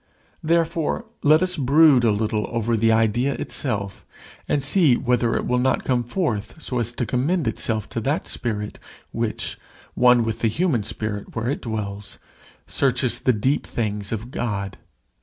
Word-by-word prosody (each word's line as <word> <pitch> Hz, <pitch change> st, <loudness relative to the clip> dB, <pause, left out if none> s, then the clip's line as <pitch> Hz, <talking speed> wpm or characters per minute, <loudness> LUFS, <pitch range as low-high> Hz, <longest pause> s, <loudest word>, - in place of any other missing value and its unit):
Therefore 165 Hz, +5 st, 0 dB, 0.2 s
let 155 Hz, +4 st, +5 dB
us 185 Hz, 0 st, 0 dB
brood 140 Hz, -1 st, +5 dB
a 115 Hz, -, +4 dB
little 105 Hz, 0 st, -1 dB
over 115 Hz, 0 st, 0 dB
the 115 Hz, +1 st, +3 dB
idea 115 Hz, +5 st, +2 dB
itself, 100 Hz, -7 st, -3 dB, 0.5 s
and 140 Hz, -, +1 dB
see 145 Hz, -3 st, +4 dB
whether 120 Hz, -2 st, +1 dB
it -, -, -1 dB
will 125 Hz, 0 st, +1 dB
not 130 Hz, +1 st, +1 dB
come 125 Hz, -2 st, +1 dB
forth 120 Hz, -, -3 dB
so 125 Hz, -5 st, -2 dB
as 120 Hz, 0 st, 0 dB
to 120 Hz, -, -2 dB
commend 135 Hz, -, 0 dB
itself 110 Hz, -1 st, -1 dB
to -, -, -3 dB
that -, -, -1 dB
spirit, 105 Hz, -3 st, -3 dB, 0.3 s
which, -, -, -3 dB, 0.3 s
one 125 Hz, -1 st, +5 dB
with 115 Hz, 0 st, -3 dB
the 115 Hz, -, +1 dB
human 140 Hz, -, +1 dB
spirit 105 Hz, 0 st, -4 dB
where 115 Hz, +3 st, -1 dB
it -, -, -3 dB
dwells, 105 Hz, -3 st, -5 dB, 0.5 s
searches 130 Hz, -2 st, +1 dB
the 130 Hz, -, +2 dB
deep 130 Hz, +6 st, 0 dB
things 105 Hz, -3 st, -3 dB
of 115 Hz, +3 st, -4 dB
God. 100 Hz, -6 st, -3 dB
120 Hz, 160 wpm, -23 LUFS, 110-135 Hz, 0.5 s, let